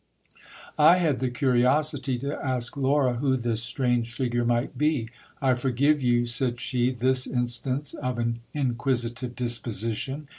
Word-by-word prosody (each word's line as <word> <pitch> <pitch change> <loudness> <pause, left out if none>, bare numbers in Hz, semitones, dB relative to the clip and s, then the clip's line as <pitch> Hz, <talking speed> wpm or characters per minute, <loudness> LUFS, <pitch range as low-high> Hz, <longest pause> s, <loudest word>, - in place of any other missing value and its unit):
I 155 +4 +8
had 155 -7 +1
the 130 - 0
curiosity 130 +2 +1
to 140 +4 -4
ask 125 -3 -2
I^ura 135 -2 +1
who 130 +1 +1
this 115 -2 0
strange 120 -1 -1
figure 120 -1 -1
might 120 +2 0
be 150 -7 0 0.3
I 130 -2 +3
forgive 135 +4 +1
you, 120 -1 +2
said 120 0 0
she, 125 0 0
this 130 +1 0
instance 125 +3 -2
of 125 -3 -3
an 115 0 -1
inquisitive 125 -2 -2
disposition. 120 +3 -2
125 Hz, 140 wpm, -26 LUFS, 120-135 Hz, 0.3 s, I